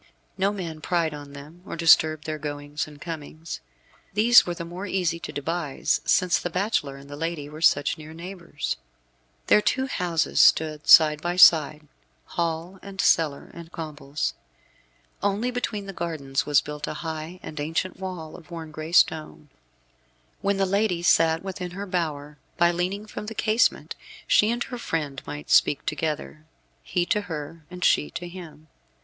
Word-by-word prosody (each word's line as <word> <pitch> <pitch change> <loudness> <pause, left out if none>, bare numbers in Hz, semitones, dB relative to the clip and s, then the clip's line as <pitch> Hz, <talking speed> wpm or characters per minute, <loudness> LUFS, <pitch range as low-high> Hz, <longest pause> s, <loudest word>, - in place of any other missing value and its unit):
No 195 +1 +1
man 170 -6 -6
pried 165 -2 0
on 145 -1 -9
them, 150 +5 -12
or - - -6
disturbed 155 -2 +4
their 155 -1 -4
goings 145 0 -4
and 150 -1 -13
comings. 160 -1 -7 0.6
These 230 +2 +7
were 175 - -2
the 170 - -6
more 180 +4 -6
easy 180 -3 0
to - - -6
devise 155 0 -1
since 180 -1 +3
the 175 - -3
bachelor 180 -7 -1
and 140 0 -13
the 145 - -8
lady 165 -1 -3
were 155 +2 -10
such 145 -2 +3
near 155 0 -10
neighbours. 170 -2 -5 0.7
Their 210 - +5
two 265 +5 +1
houses 175 - -1
stood 155 -1 +3
side 155 -2 +8
by 175 +1 -1
side, 155 -3 +6 0.4
hall 170 +2 -3
and 195 -1 -11
cellar 155 -7 +2
and 170 0 -11
combles. 150 -4 -4 0.9
Only 205 +5 0
between 225 -4 -3
the 195 - -7
gardens 150 -7 -3
was 145 -1 +4
built 150 0 -6
a - - -4
high 160 +3 -5
and 155 - -7
ancient 165 +5 -2
wall, 180 -5 -6
of 170 - -14
worn 165 -2 -7
gray 155 +2 -7
stone. 155 -3 +2 0.9
When 200 0 +1
the 195 - +2
lady 195 -2 0
sat 165 -1 +4
within 185 -2 -5
her 200 - -4
bower, 150 -6 -3 0.2
by 175 0 +4
leaning 185 +4 -2
from 210 0 -7
the 225 - -6
casement 220 +2 +1 0.3
she 210 - +4
and 240 +1 0
her 245 -2 -7
friend 145 - -3
might 75 0 -7
speak 145 - +4
together, 155 -1 -3 0.4
he 175 -1 -1
to 210 - +1
her, 160 -3 -7
and 180 0 -7
she 150 - +3
to 175 - -6
him. 170 -3 -11
165 Hz, 165 wpm, -25 LUFS, 150-185 Hz, 0.9 s, side